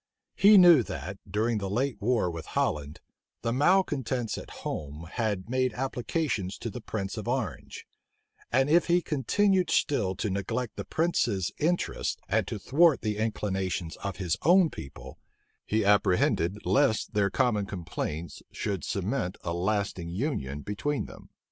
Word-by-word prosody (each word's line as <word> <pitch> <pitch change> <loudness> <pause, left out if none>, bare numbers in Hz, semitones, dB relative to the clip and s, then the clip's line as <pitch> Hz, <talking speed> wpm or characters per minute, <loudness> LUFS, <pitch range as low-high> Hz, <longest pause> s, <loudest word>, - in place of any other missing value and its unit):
He 205 +1 +7
knew 175 -6 +8
that, 95 -3 -6
during 110 +3 0
the 100 -1 -3
late 125 +6 -1
war 110 -5 +1
with 80 -1 -7
Holland, 75 +1 -1 0.4
the 115 0 0
malecontents 135 - +1
at - - -8 0.2
home 75 +2 -5
had 105 -5 -2
made 130 -1 0
applications 125 - -2
to 115 - -5
the 120 - -7
prince 100 -1 -4
of 110 - -5
Orange; 125 -5 -3 0.7
and 135 +2 +3
if 170 +4 +4
he 175 0 +3
continued 185 - +1
still 100 -10 +1
to 105 - -2
neglect 110 +5 -3
the - - -5
prince's 115 - 0
interests, 175 +4 0
and - - +1
to - - -4
thwart 155 0 +4
the 105 -2 -2
inclinations 95 -6 -2
of 100 -2 -4
his 90 -4 -1
own 175 +1 +5
people, 70 0 -10 0.5
he 110 -1 +1
apprehended 100 -1 +2
lest 135 -7 +2
their 100 -1 +2
common 105 -4 +1
complaints 85 -3 -5
should 100 -7 -3
cement 90 +3 -2
a 85 - -2
lasting 95 -1 -1
union 85 - -3
between 130 - -2
them. - - -13
110 Hz, 150 wpm, -28 LUFS, 95-135 Hz, 0.7 s, knew